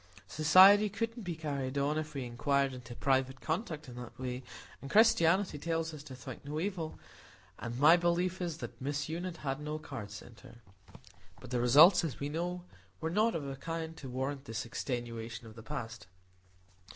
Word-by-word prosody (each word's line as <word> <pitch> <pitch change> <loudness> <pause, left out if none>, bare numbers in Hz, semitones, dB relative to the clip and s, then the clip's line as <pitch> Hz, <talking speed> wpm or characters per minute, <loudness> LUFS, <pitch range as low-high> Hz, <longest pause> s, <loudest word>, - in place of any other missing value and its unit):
Society 190 +7 +7
couldn't 230 +4 -3
be 175 -4 -4
carried 140 -4 -3
on 140 +2 +1
if 155 -1 -4
we 135 - -2
inquired 140 +3 0
into 120 -1 -9
private 130 0 +1
conduct 160 - -3
in 125 - -9
that 120 -1 -9
way,—and 130 +2 -8
Christianity 185 -5 +4
tells 165 +1 -2
us 150 - -8
to 135 -3 -10
think 130 0 -9
no 150 +2 -4
evil,—and 160 - -7
my 155 +4 +8
belief 175 +2 0
is, 170 -3 -2
that - - -8
Miss 145 +2 -2
Unit 175 +1 -4
had 135 0 -1
no 150 +1 -4
cards 130 -10 -7
sent 110 +2 -12
her." - - -14 0.8
But 100 - -12
the 125 -1 +1
results, 155 +5 +6
we 145 - -3
know, 175 +3 -3 0.4
were 160 0 -2
not 215 +4 +2
of 145 -4 -3
a 135 - -4
kind 165 +3 -5
to 135 - -8
warrant 135 +2 -3
this 115 -2 -4
extenuation 115 -2 -5
of 110 - -11
the 115 - -10
past. 110 -2 -6
145 Hz, 175 wpm, -32 LUFS, 130-165 Hz, 0.8 s, my